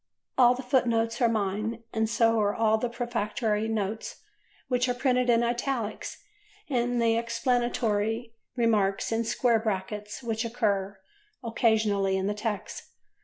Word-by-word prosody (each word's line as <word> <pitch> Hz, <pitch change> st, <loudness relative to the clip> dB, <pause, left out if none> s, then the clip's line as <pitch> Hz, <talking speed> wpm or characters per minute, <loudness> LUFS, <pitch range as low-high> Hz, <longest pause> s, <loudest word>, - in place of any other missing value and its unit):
All 250 Hz, -1 st, +6 dB
the 260 Hz, -, -6 dB
footnotes 235 Hz, -2 st, +1 dB
are 235 Hz, -, +5 dB
mine 215 Hz, +2 st, -2 dB
and 220 Hz, -1 st, 0 dB
so 230 Hz, 0 st, +3 dB
are 205 Hz, -1 st, +1 dB
all 220 Hz, -1 st, +2 dB
those 235 Hz, 0 st, -3 dB
prefatory 220 Hz, -2 st, -1 dB
notes 220 Hz, 0 st, -3 dB, 0.4 s
which 250 Hz, 0 st, +1 dB
are 245 Hz, -, 0 dB
printed 250 Hz, -1 st, +1 dB
in 235 Hz, 0 st, +4 dB
italics 235 Hz, -2 st, -3 dB, 0.4 s
and 245 Hz, -3 st, 0 dB
the 230 Hz, -1 st, +3 dB
explanatory 230 Hz, -2 st, 0 dB, 0.2 s
remarks 215 Hz, -6 st, +1 dB
in 225 Hz, +1 st, +1 dB
square 235 Hz, 0 st, +2 dB
brackets 210 Hz, +1 st, -4 dB
which 225 Hz, -1 st, -1 dB
occur 205 Hz, -4 st, -1 dB, 0.5 s
occasionally 215 Hz, -4 st, +2 dB
in 190 Hz, -, -1 dB
the 205 Hz, -, 0 dB
text. 210 Hz, -1 st, -4 dB
225 Hz, 135 wpm, -27 LUFS, 210-240 Hz, 0.5 s, All